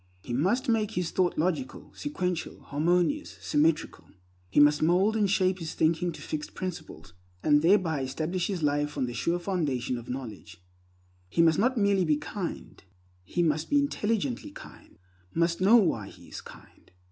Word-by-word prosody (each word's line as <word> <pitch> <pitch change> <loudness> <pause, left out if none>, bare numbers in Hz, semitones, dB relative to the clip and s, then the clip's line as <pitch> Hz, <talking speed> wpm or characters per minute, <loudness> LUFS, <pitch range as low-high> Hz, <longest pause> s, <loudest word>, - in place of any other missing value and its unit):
He 120 - -5
must 195 - +1
make 220 -2 +1
his 180 -4 -2
thought 180 -2 +1
logical, 155 -5 -2
sequential, 180 - -3
harmonious, 175 - 0
symmetrical. 155 +2 0 0.4
He 95 - +2
must 145 0 +5
mold 185 +7 +3
and 210 -3 +2
shape 185 -1 +2
his 165 -2 -5
thinking 170 +2 +1
to - - -10
fixed 150 -1 -5
principles, 165 - -7 0.3
and 150 -1 +4
thereby 165 -4 +3
establish 160 +7 -2
his 185 -6 -3
life 145 0 0
on 135 - +1
the 120 - -5
sure 170 +9 0
foundation 145 -10 -2
of 120 - -12
knowledge. 105 -8 -7 0.7
He 165 - +3
must 160 -1 +4
not 250 +4 +2
merely 200 -3 +3
be 155 -3 +2
kind, 170 +4 -6 0.4
he 175 - -1
must 155 -1 0
be 290 - +3
intelligently 215 - -1
kind; - - -14 0.4
must 170 +1 +1
know 200 +5 +6
why 165 - +3
he - - -16
is - - -7
kind. - - -16
170 Hz, 165 wpm, -28 LUFS, 145-190 Hz, 0.7 s, know